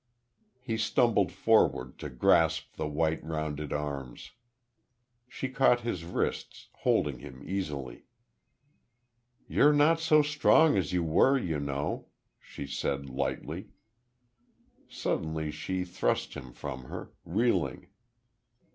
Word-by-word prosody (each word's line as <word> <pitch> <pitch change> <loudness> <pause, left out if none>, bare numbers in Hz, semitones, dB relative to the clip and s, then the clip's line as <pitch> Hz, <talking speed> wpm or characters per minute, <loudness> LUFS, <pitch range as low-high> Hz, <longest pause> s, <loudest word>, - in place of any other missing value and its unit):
He 120 -3 -3
stumbled 115 +2 +2
forward, 65 0 +2
to 75 - -5
grasp 65 -2 +2
the - - -3
white, 80 +1 0
rounded 75 -2 -4
arms. 70 -4 -5 1.0
She 130 - -4
caught 130 -2 +3
his 110 -8 -3
wrists, 85 - -3
holding 70 -5 +1
him 65 0 -11
easily. 75 -9 -4 1.4
"You're 150 +1 +5
not 150 +3 +4
so 155 -2 +4
strong 150 +1 +4
as 95 -1 0
you 90 -1 +1
were, 105 +12 +4
you 85 - -2
know," 70 0 -3 0.3
she - - -8
said, 70 -1 -3
lightly. 70 +2 -4 1.2
Suddenly 80 -1 -2
she 90 +4 -3
thrust 90 0 -1
him 65 - -8
from 65 -1 -7
her, - - -8
reeling. 90 - 0
80 Hz, 110 wpm, -29 LUFS, 70-115 Hz, 1.4 s, You're